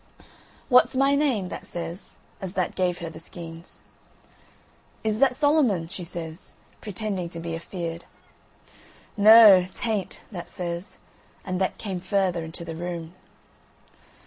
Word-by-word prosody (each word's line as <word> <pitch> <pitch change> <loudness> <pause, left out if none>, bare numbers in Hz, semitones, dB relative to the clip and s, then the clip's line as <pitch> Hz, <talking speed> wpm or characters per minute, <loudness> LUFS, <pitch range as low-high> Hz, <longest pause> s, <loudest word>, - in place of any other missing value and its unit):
"What's 250 -1 +5
my 275 +1 +3
name?" 265 -10 +1
that - - -7
says, 170 +2 -7 0.3
as 190 -2 -4
that 185 - 0
gave 180 -2 0
her 170 - -6
the 160 - -10
skeins. 165 0 -10 1.2
"Is 215 0 0
that 270 -2 +4
Solomon?" 270 - +2
she 180 - -5
says, 170 0 -7 0.3
pretending 200 -4 -3
to 170 - -7
be 165 0 -5
afeard. 170 0 -6 1.1
"Noo, 210 -3 +9
t'ain't," 210 -6 -2
that 175 -4 -7
says, 175 +1 -5 0.5
and 185 -1 -2
that 190 - 0
came 190 -4 -4
further 185 -2 0
into 160 +1 -7
the 165 -1 -6
room. 170 -1 -5
185 Hz, 130 wpm, -25 LUFS, 170-215 Hz, 1.2 s, Noo